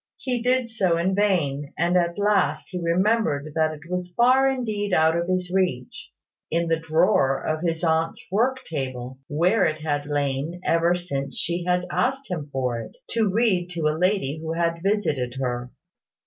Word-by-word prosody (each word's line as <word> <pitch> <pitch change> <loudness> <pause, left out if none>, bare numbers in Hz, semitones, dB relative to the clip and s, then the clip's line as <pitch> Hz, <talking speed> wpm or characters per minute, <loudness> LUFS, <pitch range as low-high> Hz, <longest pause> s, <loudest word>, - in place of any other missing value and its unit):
He 250 -2 -2
did 250 -1 +1
so 185 -6 +1
in 180 +3 +1
vain; 160 -9 0
and 170 +2 +1
at 170 -1 +1
last 205 0 +1
he 180 -1 -4
remembered 170 -4 +1
that 155 0 +2
it 150 - -14
was 180 0 -3
far 260 +3 +5
indeed 215 -6 -2
out 160 +1 +4
of 170 0 -1
his 185 -1 -1
reach, 175 -10 -1 0.4
in 170 +1 0
the 165 -1 +2
drawer 160 -4 +2
of 155 0 -1
his 165 -1 -1
aunt's 160 0 0
work 255 +6 +1
table, 130 -4 -5
where 180 +8 +2
it 155 0 0
had 145 -2 -2
lain 145 +3 -2
ever 170 +1 +3
since 140 -6 -4
she 175 +1 -2
had 180 0 +1
asked 265 +1 -1
him 155 -5 -4
for 125 -3 -1
it, 110 -1 -9 0.2
to 225 -3 +2
read 190 -4 +1
to 160 -2 0
a - - 0
lady 170 -4 0
who 160 0 -4
had 170 0 -1
visited 155 - 0
her. 125 -1 -2
170 Hz, 175 wpm, -24 LUFS, 150-195 Hz, 0.4 s, far